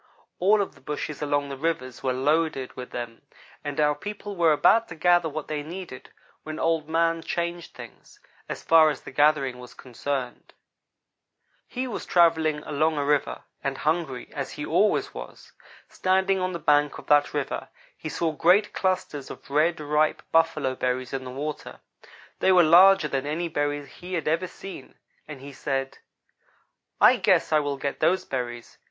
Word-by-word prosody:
All 205 +3 +4
of - - -9
the - - -21
bushes 150 0 -5
along 145 -1 0
the 140 - -5
rivers 135 -4 -3
were 130 - 0
loaded 140 +1 0
with 125 -1 -7
them, 120 -1 -7 0.4
and 145 0 -4
our 150 -1 +3
people 205 +5 -7
were 170 -3 +4
about 225 +9 +4
to 160 - -9
gather 175 0 +3
what 155 0 -6
they 150 -1 -3
needed, 165 -3 -9 0.3
when 155 0 -7
Old 160 -2 0
man 165 0 +1
changed 170 0 -4
things, 120 -2 -13 0.3
as - - -5
far 160 -1 +6
as 145 - -4
the - - -10
gathering 140 -2 +2
was 125 0 -12
concerned. 130 0 -5 1.1
"He 255 +1 -4
was 235 - -6
travelling 160 -3 +3
along 155 +1 0
a 145 - 0
river, 145 0 0 0.2
and 135 -1 -2
hungry, 155 -4 -2
as - - -5
he - - -5
always - - +1
was. - - -10 0.4
Standing 190 +1 +1
on 185 0 -2
the - - -2
bank 150 -2 +2
of - - -11
that 145 -1 +4
river, 145 -2 -3 0.3
he 155 - -7
saw 165 +1 -1
great 180 +7 +3
clusters 185 -7 -2
of - - -11
red, 155 +3 +2
ripe 150 +1 0
buffalo 165 -5 +2
berries 130 0 -2
in 130 -1 -4
the - - -6
water. 145 +4 -6 0.6
They 190 - +3
were 180 -2 +6
larger 180 +1 +7
than 140 -1 -2
any 165 +3 -2
berries 145 -2 -2
he 180 +5 -7
had 165 - -3
ever 165 +4 +1
seen, 185 -7 -10 0.3
and 150 -3 -9
he 140 +1 -10
said: 135 0 -3 1.0
"'I - - +7
guess - - +2
I 155 - +5
will 145 -1 -2
get 140 0 -4
those 185 +1 +2
berries. 120 -2 -5
150 Hz, 175 wpm, -25 LUFS, 140-170 Hz, 1.1 s, larger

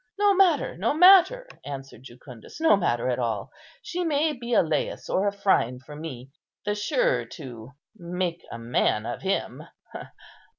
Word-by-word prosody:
"No 410 0 +4
matter, 365 -6 +2
no 225 +10 0
matter," 390 +9 +6 0.2
answered 135 -4 -8
Jucundus, 125 - -13
"no 320 -9 +5
matter 125 -11 0
at 125 -1 -1
all; 110 -5 -3 0.3
she 360 -4 -3
may 310 -1 +1
be 240 -2 -8
a - - +5
Lais 155 -3 -2
or 200 +2 +1
Phryne 195 - +1
for 140 +3 -12
me; 135 -4 -8 0.3
the 205 - 0
surer - - 0
to 125 -5 -10 0.2
make 175 -2 -4
a - - -6
man 115 -2 0
of 120 - -5
him." 195 +1 -2
180 Hz, 155 wpm, -25 LUFS, -, 0.3 s, matter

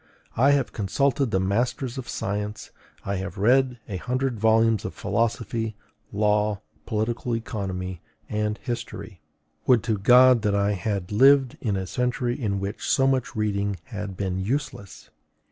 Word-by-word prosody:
I 130 +5 +4
have 140 -3 0
consulted 130 +6 0
the 95 - +1
masters 120 +6 -1
of 125 - -8
science; 105 +1 -4 0.3
I 100 0 -1
have 95 +3 -5
read 125 +4 +3
a 100 - -4
hundred 125 +2 -2
volumes 110 0 +3
of - - -5
philosophy, 115 -1 -1 0.4
law, 105 0 +1 0.3
political 115 +2 -1
economy, 95 -6 -4 0.3
and 105 0 -1
history: 120 -5 -6 0.5
would 125 -3 +5
to 110 -3 -1
God 125 +3 +6
that 105 -2 +1
I 100 0 +2
had 100 -1 -3
lived 135 +3 +5
in 105 -4 0
a 95 -1 -2
century 125 +3 -1
in 105 -6 -2
which 100 +3 -4
so 135 - +3
much 130 -2 0
reading 100 -2 0
had 105 -4 -6
been 95 -2 -2
useless! 120 0 -4
110 Hz, 145 wpm, -25 LUFS, 100-125 Hz, 0.5 s, God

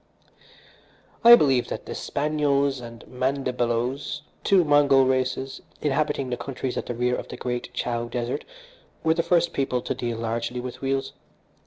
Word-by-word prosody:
"I 235 +1 +11
believe 135 - +2
that - - -5
the - - -5
Spanyols 140 -2 0
and 115 -2 -10
Mandibaloes, 130 +1 -1 0.2
two 195 -3 +5
Mongol 145 -3 +5
races 130 0 -1 0.2
inhabiting 145 -2 0
the 125 - -1
countries 130 -1 -4
at - - -4
the 120 - -3
rear 125 +1 +1
of - - -6
the - - -8
Great 125 0 -4
Chow 120 -1 -1
Desert, 120 +1 -3 0.6
were 160 0 +4
the 170 - +1
first 170 0 +2
people 135 -2 0
to - - -2
deal 120 -2 -3
largely 115 +2 -2
with 125 0 -7
wheels. 135 0 -1
130 Hz, 155 wpm, -25 LUFS, 125-145 Hz, 0.6 s, I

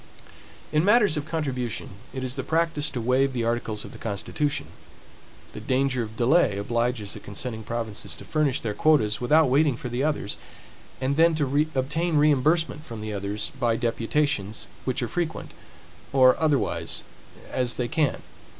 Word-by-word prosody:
In 150 +1 +3
matters 210 -3 +5
of 150 0 -3
contribution, 130 -8 -3 0.2
it 130 0 -5
is 130 -1 -3
the 135 - -3
practice 160 0 0
to 125 - -4
waive 130 +3 +2
the 120 -2 -1
articles 115 -2 -1
of - - -10
the - - -12
constitution. 115 +7 -2 0.9
The - - -6
danger 130 -1 +1
of 110 -1 -6
delay 125 - +3
obliges 115 0 -1
the - - -7
consenting 110 +2 -4
provinces 110 -1 -4
to - - -10
furnish 150 -4 +1
their 110 -3 -2
quotas, 110 -4 +2
without 150 +5 +4
waiting 140 0 +3
for 125 - -5
the 120 +3 -1
others; 145 -9 -1 0.6
and 135 +2 0
then 165 0 +5
to 145 0 +1
obtain 155 +5 0
reimbursement 150 +2 +3
from 115 -7 -8
the 110 0 -4
others, 105 +2 -2
by 120 -3 +2
deputations, 115 -1 -1 0.2
which 130 -1 -1
are - - -1
frequent, 165 +6 -3 0.6
or 130 -1 +6
otherwise, 150 -5 +1 0.5
as 125 -1 +1
they 125 - -1
can. 150 +1 0
130 Hz, 160 wpm, -25 LUFS, 115-150 Hz, 0.9 s, or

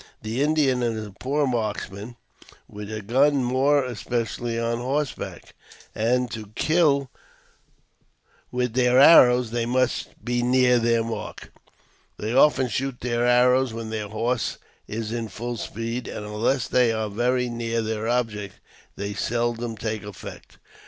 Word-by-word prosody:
The 110 +4 -2
Indian 145 -4 +2
is 115 -2 -2
a 105 - -10
poor 140 +8 -1
marks 110 -6 -2
man 105 +5 -9 0.5
with 105 0 -8
a 110 -1 -5
gun, 135 +5 +3
more 135 +3 +2
especially 120 -1 -3
on 115 0 -1
horseback, 135 +3 -4 0.4
and, 125 +2 0
to 110 -2 -6
kill 145 -5 +2 1.4
with 125 -2 -1
their 125 0 +4
arrows, 125 -5 +7
they 120 -1 -1
must 130 +1 -1
be 120 0 0
near 125 0 +4
their 115 0 +2
mark. 115 0 -6 0.7
They 110 +2 -3
often 135 -1 +4
shoot 130 +1 -3
their 120 0 0
arrows 125 0 +3
when 115 -1 -6
their 110 -2 -3
horse 115 +3 -1 0.3
is 110 0 -4
in 115 -1 -3
full 120 +4 -5
speed, 115 +3 -4
and, 105 - -6
unless 110 +3 0
they 125 -2 +3
are 110 -1 -1
very 125 +4 0
near 115 -1 -2
their 110 0 -3
object, 110 -5 -2 0.4
they 100 0 -4
seldom 120 +1 -2
take 110 0 -3
effect 105 -3 -10
120 Hz, 145 wpm, -24 LUFS, 110-125 Hz, 1.4 s, arrows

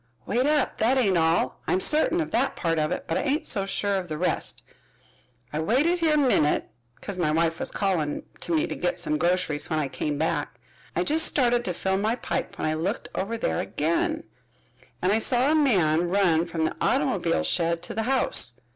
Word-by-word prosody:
"Wait 250 +5 +1
up, 300 -2 +1
that 240 +5 +3
ain't 205 -8 +3
all. 165 0 +1
I'm 185 - +2
certain 310 - +2
of 315 - -4
that 265 +4 +1
part 165 -2 0
of 155 0 0
it, - - -3
but 165 - -1
I - - 0
ain't 290 +3 0
so 195 -3 0
sure 200 0 0
of 185 -2 -4
the 155 -2 -4
rest. 180 +3 -2 0.9
I 150 - -1
waited 280 - +2
here 320 -2 +3
a - - +3
minit, 250 - +2 0.2
because 195 -3 -7
my 165 -3 +1
wife 165 +1 +1
was - - -2
calling 175 -7 -1 0.2
to - - -5
me 155 - +2
to - - -4
git 175 0 -2
some 150 0 -2
groceries 175 -4 0
when 160 - 0
I 150 -2 0
came 145 +2 -3
back. 150 -5 -2 0.4
I 175 - +1
just 315 - +2
started 245 -3 +2
to 180 - -1
fill 190 +2 0
my 215 +4 0
pipe - - -4
when - - -2
I 155 - +1
looked 175 +8 -3
over 220 +5 -2
there 80 - -1
again 170 - -1 0.8
and 185 - +3
I 215 - +3
saw 250 +5 +2
a - - +3
man 175 - +3
run 175 -3 +2
from 165 -1 -1
the - - -2
automobile 80 - +1
shed 170 - 0
to - - -4
the 220 - -1
house. 255 - +2
185 Hz, 210 wpm, -25 LUFS, 160-245 Hz, 0.9 s, that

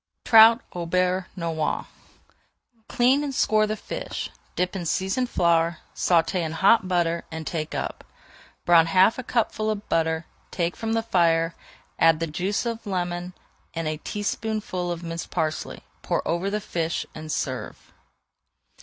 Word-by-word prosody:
TROUT 225 +1 +8
AU 175 -1 -4
BEURRE 180 +1 +1
NOIR 165 -3 -2 1.0
Clean 265 +3 +3
and 280 -2 -3
score 215 -2 +3
the 215 - -1
fish, - - -5 0.2
dip 180 +1 -1
in 175 -3 -3
seasoned 190 +9 0
flour, 170 -2 +2 0.2
sauté 175 +1 +2
in 160 -1 -3
hot 190 +4 +4
butter, 170 -2 +1
and 160 0 -6
take 155 -1 -3
up. - - -4 0.6
Brown 165 -1 +6
half 185 +8 +4
a - - -4
cupful 220 -2 0
of 210 -1 -3
butter, 160 0 +1 0.2
take 170 -1 -1
from 225 0 -2
the 225 0 +1
fire, 165 -5 +2 0.5
add 165 -1 +5
the 165 - 0
juice 180 +8 -2
of 230 -1 -3
a 210 - -7
lemon 180 -1 -2 0.4
and 165 -1 -2
a 155 0 -2
teaspoonful 205 -1 -3
of 170 0 -5
minced 165 0 -5
parsley, 155 0 -3 0.2
pour - - -1
over 175 +4 0
the 210 +1 -1
fish, 165 -3 -2
and 155 0 -7
serve. - - -4
180 Hz, 155 wpm, -25 LUFS, 165-215 Hz, 1.0 s, TROUT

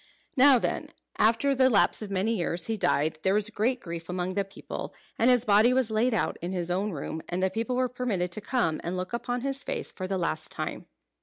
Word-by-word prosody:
Now 270 0 +7
when, - - -2 0.3
after 230 +6 +3
the 260 -1 +4
lapse 215 -2 +3
of 210 - -5
many 200 +4 0
years, 170 -2 -2
he 225 - -1
died, 155 -6 +1
there 190 +3 +2
was 210 +1 0
great 245 +5 0
grief 170 -3 -7
among 180 +1 -2
the 200 +1 0
people, 195 +1 -8 0.2
and 235 - +5
his 250 -1 +4
body 215 +4 +5
was 255 -3 +1
laid 225 +4 +2
out 220 - 0
in 175 +2 -3
his 175 -1 -1
own 195 +4 0
room, 160 0 -5
and 180 +1 -1
the 190 - +2
people 230 +5 -2
were 255 0 +2
permitted 230 -8 -2
to 215 - -4
come 200 -11 0
and 175 +2 -3
look 185 +4 -4
upon 245 +1 -2
his 275 +1 -2
face - - -2
for 185 - -5
the 190 0 -1
last 165 -3 -1
time. - - -5
210 Hz, 230 wpm, -28 LUFS, 180-245 Hz, 0.3 s, Now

